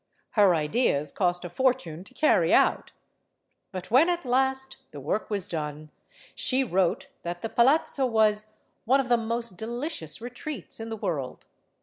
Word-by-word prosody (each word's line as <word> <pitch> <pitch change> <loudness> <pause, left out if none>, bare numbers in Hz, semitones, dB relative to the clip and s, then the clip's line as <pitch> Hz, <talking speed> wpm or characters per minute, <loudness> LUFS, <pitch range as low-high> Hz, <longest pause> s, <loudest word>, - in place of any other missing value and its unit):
Her 200 -5 +4
ideas 150 - +1
cost 180 -2 0
a - - -5
fortune 180 -7 -1
to 260 - -15
carry 305 - +3
out. - - +3 0.8
But 185 +1 -7
when 280 +8 +5
at 350 -3 -1
last 265 +1 0
the 145 - -10
work 200 +10 -2
was 200 -4 0
done, 150 -1 -5 0.4
she 265 +1 +2
wrote 190 -7 0
that 175 0 -6
the 225 - -2
palazzo 270 +2 +2
was 215 -2 +2 0.4
"one 265 +4 +4
of 260 -2 -2
the 240 - +5
most 230 -3 -2
delicious 235 - -3
retreats 245 - -3
in 225 0 -6
the 225 - -5
world." 165 -11 -4
220 Hz, 155 wpm, -26 LUFS, 175-255 Hz, 0.8 s, when